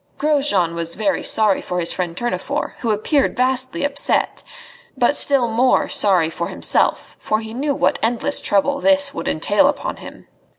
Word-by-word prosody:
Grosjean 280 - +1
was 170 0 -2
very 205 -2 -1
sorry 215 -3 +2
for 180 - -4
his 170 - +1
friend 175 -2 -4
Tournefort, 240 +6 -3
who 235 - -3
appeared 230 +7 0
vastly 260 +2 0
upset, 285 0 -1 0.6
but 250 +3 +2
still 275 -4 +2
more 240 +3 +1
sorry 180 -6 +2
for 170 - -4
himself, - - 0
for 215 - -1
he 220 0 -8
knew 280 +3 -2
what - - 0
endless 240 +5 0
trouble 280 +8 +1
this 285 -1 +3
would - - -6
entail - - +2
upon - - -3
him. - - -12
240 Hz, 165 wpm, -19 LUFS, 195-280 Hz, 0.6 s, this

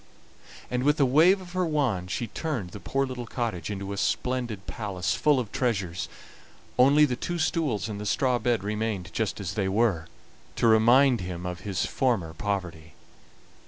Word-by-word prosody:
And 125 0 0
with 145 +3 +2
a 140 - +5
wave 165 +9 +5
of 180 -1 -11
her 185 0 +1
wand 135 - 0
she 120 - -2
turned 115 - -4
the 105 - -8
poor 135 +10 -1
little 125 -2 -6
cottage 115 -7 -3
into 100 -1 -4
a - - -6
splendid 115 -1 -1
palace, 100 -5 -2
full 150 -3 +3
of 115 -5 -4
treasures; 95 -9 -1 0.7
only 140 +4 +6
the 125 -4 -1
two 175 +7 -3
stools 155 - 0
and 105 -2 -5
the 105 - -4
straw 125 +2 +1
bed 120 -5 0
remained 105 -4 -3
just 110 +1 -1
as 95 -2 -4
they 100 -2 0
were, 95 -6 +1 0.5
to - - 0
remind 120 +3 +5
him 90 -1 -5
of 90 -1 -4
his 95 0 -2
former 110 -12 0
poverty. 85 -4 -4
110 Hz, 175 wpm, -27 LUFS, 95-130 Hz, 0.7 s, only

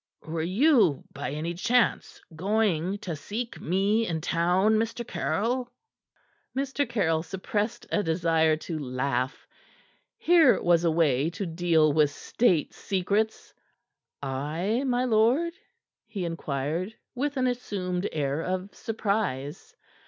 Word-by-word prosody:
"Were 160 +1 -3
you, 195 - +3
by 125 - -4
any 155 +4 -3
chance, 235 +7 +1 0.2
going 195 -1 +1
to 170 -4 -3
seek 225 +10 -5
me 200 +6 +1
in 165 -2 -1
town, 180 +7 +2
Mr. 225 +1 -2
Caryll?" 245 +4 -1 0.9
Mr. 275 +1 -1
Caryll 165 -8 +1
suppressed 205 +5 -3
a 210 - +2
desire 160 -2 +2
to 160 -3 -3
laugh. 130 -1 -2 0.7
Here 330 -6 +5
was 170 -1 +3
a - - +4
way 155 -3 +2
to 180 +3 -5
deal 165 -3 +2
with 150 -1 +4
State 170 +2 +1
secrets. 200 +3 -1 0.7
"I, 155 - -1
my 250 0 +1
lord?" 250 +9 +3 0.5
he 195 -4 -4
inquired, 165 +4 -3 0.2
with 280 +3 -2
an 255 - +2
assumed 200 -7 -2
air 145 0 -1
of 185 +3 -3
surprise. 200 - -3
180 Hz, 120 wpm, -27 LUFS, 160-225 Hz, 0.9 s, Here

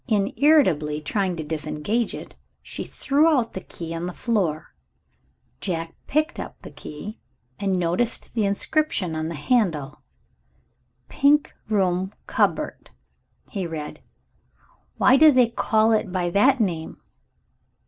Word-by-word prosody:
In 205 -4 +1
irritably 185 - +3
trying 185 +4 -1
to 160 - -4
disengage 160 +8 -2
it, - - -9 0.3
she - - -5
threw 290 +3 +2
out 265 -8 +2
the 190 - -5
key 165 -2 -6
on 165 +1 -3
the 180 - -5
floor. 190 -11 -1 0.9
Jack 165 -3 -3
picked 310 +3 0 0.2
the - - -9
key 205 +9 -8 0.4
up - - -7
and 195 -2 +1
noticed 180 +7 -1
the 225 - +1
inscription 200 - 0
on 155 0 -2
the 165 - -4
handle. 150 - 0 1.1
"Pink 290 +1 +3 0.2
Room 190 -2 0
Cupboard," - - -1 0.6
he 190 -5 -3
read. 155 -2 -6 1.0
"Why 255 - +6
do 310 +2 +8
they 250 -3 +4
call 220 -1 +2
it 215 -4 +1
by 175 -2 -1
that 255 +8 +4
name?" 170 -7 -2
195 Hz, 130 wpm, -24 LUFS, 165-240 Hz, 1.1 s, do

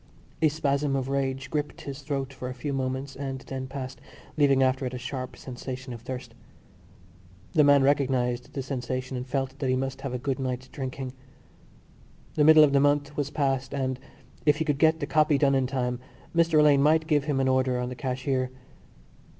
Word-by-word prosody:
A 160 - +6
spasm 145 -2 0
of 135 -1 -2
rage 135 0 -2
gripped 150 -1 -3
his 140 0 -7
throat 135 -1 -3
for 130 -1 -6
a 130 - -6
few 140 +3 -4
moments 135 +1 -3
and 135 -1 -4
then 130 -1 -5
passed, 130 -2 -7 0.3
leaving 140 -3 +4
after 130 +1 +1
it 125 - -5
a - - -3
sharp 130 0 -5
sensation 130 0 -7
of 115 - -9
thirst. 130 +1 -7 1.2
The 155 - +5
man 145 -1 +6
recognised 130 -3 +1
the 135 - -3
sensation 130 0 -3
and 125 +1 -4
felt 135 +1 -2
that 135 - -1
he 130 - +3
must 135 +1 -3
have 135 -2 -4
a - - 0
good 130 +1 -2
night's 130 -1 -3
drinking. 130 -1 -5 1.2
The 150 - +2
middle 155 0 +8
of 145 -2 +4
the 140 - +5
month 145 +1 +2
was 145 -1 -1
passed 135 -2 -1
and, 130 -2 -1 0.4
if 150 -1 +4
he 160 - -1
could 145 -3 0
get 160 +1 +4
the - - 0
copy 155 -2 +3
done 140 0 +3
in 135 -1 +2
time, 125 -2 -2 0.4
Mr 165 -1 +4
Alleyne 145 -2 +6
might 155 +2 +4
give 145 -3 +2
him 145 -3 0
an 135 - +2
order 130 -1 +2
on 125 0 -2
the 125 - -6
cashier. 130 0 -1
135 Hz, 200 wpm, -27 LUFS, 130-145 Hz, 1.2 s, middle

